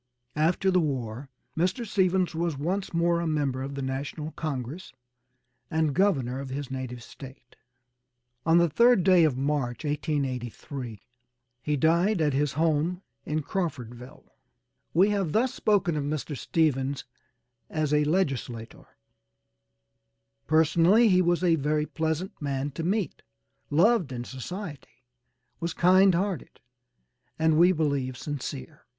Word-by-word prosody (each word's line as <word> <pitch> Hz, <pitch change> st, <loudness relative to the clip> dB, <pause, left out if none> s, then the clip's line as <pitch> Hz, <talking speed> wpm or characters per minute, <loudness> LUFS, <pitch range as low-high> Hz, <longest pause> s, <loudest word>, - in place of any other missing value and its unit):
After 170 Hz, +5 st, +2 dB
the 185 Hz, -, +4 dB
war 135 Hz, -4 st, -3 dB, 0.3 s
Mr. 185 Hz, +8 st, 0 dB
Stephens 190 Hz, -4 st, +1 dB
was 165 Hz, -2 st, -1 dB
once 185 Hz, +7 st, -2 dB
more 170 Hz, 0 st, +2 dB
a 170 Hz, -, -2 dB
member 145 Hz, -4 st, -1 dB
of 140 Hz, +1 st, -5 dB
the 140 Hz, -, -4 dB
National 140 Hz, +4 st, -4 dB
Congress 150 Hz, +2 st, -5 dB, 0.8 s
and 160 Hz, -2 st, +1 dB
Governor 135 Hz, -8 st, +1 dB
of 135 Hz, -1 st, -6 dB
his 135 Hz, 0 st, -5 dB
native 125 Hz, -2 st, -5 dB
State. 130 Hz, -2 st, -13 dB, 0.9 s
On 165 Hz, +1 st, +4 dB
the 170 Hz, 0 st, +5 dB
3rd 235 Hz, -, +4 dB
day 180 Hz, -2 st, +6 dB
of 140 Hz, -5 st, 0 dB
March, 135 Hz, -1 st, -1 dB
1883, 135 Hz, -, -3 dB, 0.6 s
he 150 Hz, -1 st, -1 dB
died 170 Hz, +7 st, +3 dB
at 150 Hz, -3 st, +2 dB
his 145 Hz, +1 st, 0 dB
home 165 Hz, +4 st, 0 dB, 0.2 s
in 155 Hz, 0 st, -1 dB
Crawfordville. 125 Hz, -8 st, -5 dB, 0.7 s
We 190 Hz, +5 st, +4 dB
have 195 Hz, -6 st, -1 dB
thus 245 Hz, +3 st, +2 dB
spoken 195 Hz, -6 st, +1 dB
of 150 Hz, -, -1 dB
Mr. 145 Hz, 0 st, -3 dB
Stephens 140 Hz, -2 st, 0 dB, 0.7 s
as 155 Hz, -2 st, -1 dB
a 150 Hz, 0 st, +4 dB
legislator; 135 Hz, -8 st, -2 dB, 1.6 s
personally, 165 Hz, +8 st, +4 dB
he 185 Hz, -1 st, +5 dB
was 175 Hz, 0 st, +1 dB
a 170 Hz, -2 st, +4 dB
very 150 Hz, +1 st, 0 dB
pleasant 160 Hz, +4 st, -3 dB
man 140 Hz, 0 st, -2 dB
to 140 Hz, -, -6 dB
meet, 195 Hz, +3 st, -1 dB, 0.5 s
loved 175 Hz, -, +3 dB
in 120 Hz, -1 st, -4 dB
society, 135 Hz, -, -8 dB, 0.6 s
was 170 Hz, 0 st, -3 dB
kind 185 Hz, +1 st, +5 dB
hearted, 185 Hz, -4 st, -3 dB, 0.8 s
and 160 Hz, -1 st, +3 dB
we 175 Hz, +2 st, +7 dB
believe 140 Hz, -6 st, -1 dB
sincere. 145 Hz, +1 st, -6 dB
155 Hz, 130 wpm, -27 LUFS, 135-175 Hz, 1.6 s, we